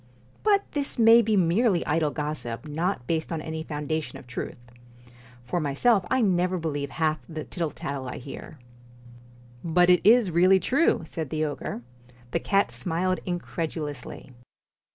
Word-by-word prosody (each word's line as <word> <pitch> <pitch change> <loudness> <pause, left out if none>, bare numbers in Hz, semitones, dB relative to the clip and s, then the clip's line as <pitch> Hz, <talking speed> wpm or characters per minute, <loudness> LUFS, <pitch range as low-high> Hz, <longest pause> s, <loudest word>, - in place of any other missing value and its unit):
But 405 -2 +3
this 285 -2 -2
may 230 0 +7
be 215 -2 +1
merely 185 +2 +2
idle 155 0 +1
gossip, 150 -4 -4
not 160 -2 -2
based 160 +4 -2
on 165 - -2
any 160 0 -5
foundation 155 0 -4
of - - -13
truth. 125 -1 -6 0.9
For 175 +8 -2
myself 175 - +2
I 260 - +2
never 185 -3 +2
believe 145 -4 -3
half 155 0 0
the 155 -2 -5
tittle 170 -4 -3
tattle 140 -2 -5
I - - -6
hear.' 140 +3 -9
I - - -24 1.0
But 175 +2 +4
it 180 - +5
is 220 -2 +5
really 185 +3 +5
true, 260 - +2
' - - -9
said 160 -2 -5
the 155 +1 -1
ogre. 145 -4 -5 0.5
The - - +1
cat 200 0 +1
smiled 185 +1 -1
incredulously. 160 -7 -5
165 Hz, 155 wpm, -26 LUFS, 150-185 Hz, 1.0 s, may